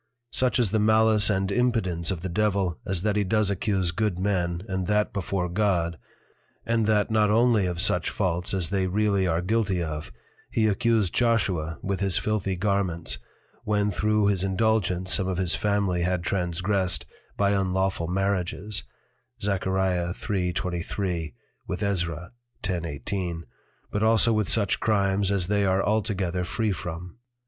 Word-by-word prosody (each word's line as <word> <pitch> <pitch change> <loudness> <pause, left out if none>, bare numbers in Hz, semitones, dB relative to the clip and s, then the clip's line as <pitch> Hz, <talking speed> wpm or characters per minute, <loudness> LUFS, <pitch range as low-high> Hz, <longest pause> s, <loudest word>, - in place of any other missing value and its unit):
Such 125 -4 +1
is 115 -6 +2
the 110 - +2
malice 110 -1 +4
and 95 -1 0
impudence 100 -8 0
of 90 -4 -2
the 95 - -3
Devil, 95 -2 0
as 95 -1 -1
that 105 -1 +1
he 105 - +2
does 105 +1 +1
accuse 95 -2 0
good 105 0 -1
Men, 90 -2 -1
and 95 -2 -2
that 105 0 +1
before 95 -2 -2
God, 85 -3 0 0.7
and 115 -2 +1
that 105 0 +2
not 105 -1 +3
only 110 -3 +3
of 90 -1 -3
such 100 -1 +2
Faults 90 -3 -1
as 95 -3 0
they 95 -2 +1
really 100 0 +1
are 85 +1 0
guilty 100 -3 0
of, 75 -1 -5 0.4
he 110 -1 +1
accused 110 -2 +1
Joshua 95 -10 +1
with 95 0 -2
his 95 -2 +1
filthy 105 -3 -1
Garments, 90 - -1 0.4
when 105 -1 +1
through 105 0 +1
his 100 -2 +1
Indulgence 95 -2 +1
some 95 - +2
of 95 -2 -2
his 90 -1 +2
Family 100 -4 0
had 90 0 0
transgressed 90 -3 0 0.3
by 100 0 +2
unlawful 95 -3 0
Marriages, 95 +2 -1 0.6
Zach. 100 -2 -1
3.23. 90 - -1 0.3
with 90 +4 -3
Ezra. 85 -4 -2 0.3
10.18. 85 0 -3 0.5
but 105 - -1
also 110 +1 +4
with 105 -3 0
such 100 -4 +2
Crimes, 100 -2 +1
as 100 -3 +2
they 100 +2 +1
are 95 0 +2
altogether 95 -4 0
free 110 +4 -1
from. 85 +2 -6
95 Hz, 150 wpm, -26 LUFS, 90-105 Hz, 0.7 s, malice